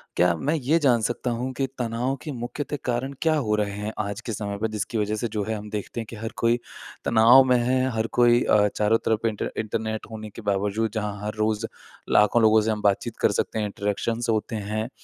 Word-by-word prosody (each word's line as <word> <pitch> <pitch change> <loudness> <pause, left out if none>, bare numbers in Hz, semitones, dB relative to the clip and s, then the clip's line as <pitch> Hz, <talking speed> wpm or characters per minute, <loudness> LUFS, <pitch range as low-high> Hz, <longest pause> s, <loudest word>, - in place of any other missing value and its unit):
क्या 85 -1 +3
मैं 150 +4 0
ये 150 +3 +2
जान 125 -6 +3
सकता 120 +2 -1
हूँ 130 +2 -3
कि 135 - -1
तनाव 120 +3 -1
के 155 - -5
मुख्य 120 +3 -4
ते 145 - -4
कारण 125 +3 -1
क्या 160 -1 +3
हो 110 -8 +1
रहे 105 -1 -1
हैं? 105 +1 -3
आज 100 +2 -3
के 115 -2 -5
समय 100 -1 -4
पे 110 +2 -1
जिसकी 110 +2 -3
वजह 105 0 0
से 120 +2 -2
जो 105 -1 -1
है 110 0 -2
हम 105 0 -7
देखते 105 +2 -5
हैं 115 - -4
कि 115 - -8
हर 110 +1 -5
कोई 120 +1 +2 0.5
तनाव 115 +4 +7
में 125 -1 +3
है 130 +2 +1
हर 110 +1 0
कोई 120 0 +6
अ, 105 -1 +4
चारों 105 +1 +3
तरफ 110 0 +1
इन्टर 105 -2 -3
इंटरनेट 110 0 -3
होने 110 -1 -7
के 115 - -10
बावजूद 105 +2 0
जहाँ 105 -1 -3
हर 105 - -2
रोज़ 110 +1 0 0.5
लाखों 105 +3 +5
लोगों 110 0 +5
से 110 +1 0
हम 105 -1 -2
बातचीत 105 +3 0
कर 105 - +4
सकते 110 - -1
हैं। 105 - 0
इंटरेक्शन 105 +3 -2
होते 110 +1 -1
हैं। 110 +3 -3
110 Hz, 230 wpm, -25 LUFS, 105-120 Hz, 0.5 s, तनाव